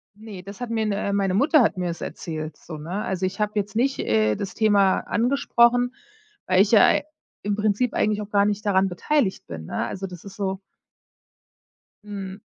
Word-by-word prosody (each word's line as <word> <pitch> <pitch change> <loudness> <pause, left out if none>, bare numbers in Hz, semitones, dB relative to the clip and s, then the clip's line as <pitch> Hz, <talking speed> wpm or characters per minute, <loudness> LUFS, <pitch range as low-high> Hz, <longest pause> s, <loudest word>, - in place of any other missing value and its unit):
Ne, 210 -3 -10
das 200 +1 -10
hat 245 - -4
mir 225 -1 0
ne 200 -1 -1
meine 195 -2 +1
Mutter 290 - +4
hat 210 - +2
mir 180 -1 -1
das 170 -1 -5
erzählt, 155 -2 -6
so, 160 - -9
ne? 175 +7 -4
Also 190 0 -2
ich 185 +2 -4
habe 210 0 0
jetzt 205 0 -2
nicht, 265 +4 +1
äh, 110 0 +2
das 195 - -5
Thema 205 -3 +3
angesprochen, 245 -1 +2 0.5
weil 185 0 +4
ich 205 - +2
ja 220 - +7
ei - - +3 0.4
im 205 0 -1
Prinzip 215 +3 0
eigentlich 210 0 +1
auch 210 - -7
gar 200 -1 +3
nicht 210 +1 -1
daran 195 -1 +3
beteiligt 195 +4 0
bin, 80 -1 -7
ne? 100 - -2
Also 195 0 -5
das 180 -3 -11
ist 200 - -10
so 190 -3 -2 1.5
Mhm. 195 -1 -7
200 Hz, 195 wpm, -24 LUFS, 185-215 Hz, 1.5 s, ja